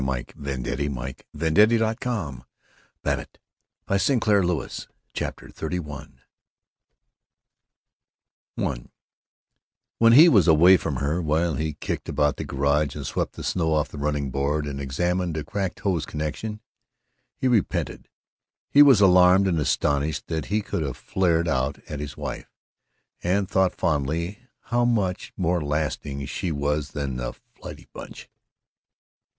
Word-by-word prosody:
While 65 0 0
she - - -4 0.3
looked 65 -2 -5
at - - -2
him 70 -1 -1
pleadingly 80 - +1
he - - +5
drove 110 +2 -1
on 80 - -3 0.6
in - - +1
a - - -8 0.7
dreadful 100 +7 +2 0.3
silence. 85 -6 -3 0.3
CHAPTER - - -5
XXXI 75 -4 -5 2.5
I - - -3 1.1
When 115 0 +6
he 155 +7 +9
was 100 - +5
away 85 +4 +7
from 80 -4 -3
her, 75 +7 -1
while 80 +1 +1
he 80 0 -2
kicked - - -5
about 75 0 +1
the - - -4
garage 70 +1 0
and 70 -2 -6
swept - - -2
the - - -8
snow 80 -3 0
off 75 - 0
the 75 - -8
running 70 -2 -1
board 70 +3 0
and 70 -1 -5
examined 85 +5 -1
a 75 - -2
cracked 95 +3 -4
hose 90 -7 0
connection, 90 +8 -4 0.8
he 130 - 0
repented, 115 -7 0 0.6
he 145 - +7
was 135 -8 +7
alarmed 90 0 +6
and 85 -4 +1
astonished 75 0 0
that 80 -1 -3
he 105 +1 -1
could 100 - -3
have 70 -5 -3
flared 85 -3 +1
out 65 -1 0
at 75 - -5
his 75 0 -6
wife, - - -6 0.7
and 95 +2 +1
thought 95 -1 +2
fondly 85 - -1 0.2
how 120 +1 0
much 105 -7 0
more 90 -1 +1
lasting 75 -2 -2
she 85 +5 -3
was 75 0 -1
than 70 -4 -3
the - - -4 0.2
flighty - - -10
Bunch. - - -10
80 Hz, 145 wpm, -24 LUFS, 70-95 Hz, 2.5 s, he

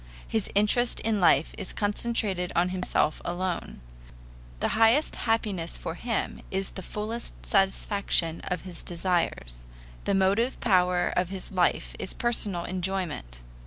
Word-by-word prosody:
His 220 -3 -1
interest 210 +4 +3
in 215 -3 0
life 165 -3 +4
is - - -2
concentrated 205 -3 0
on 175 +2 +3
himself 180 -4 0
alone. 175 - -3 0.8
The - - 0
highest 225 +7 +4
happiness 210 -7 -1
for 165 - -5
him 225 +5 -3
is 190 0 -2
the 190 - -7
fullest 215 +5 -5
satisfaction 195 -4 +2
of 180 -1 -2
his 180 -3 -6
desires. 165 - -2 0.4
The 200 - +2
motive 200 +7 +2
power 180 -4 +3
of 180 -1 +1
his 190 0 -6
life 180 -2 +1
is 190 - -5
personal 210 -7 +2
enjoyment. 180 - -3
190 Hz, 130 wpm, -27 LUFS, 175-210 Hz, 0.8 s, life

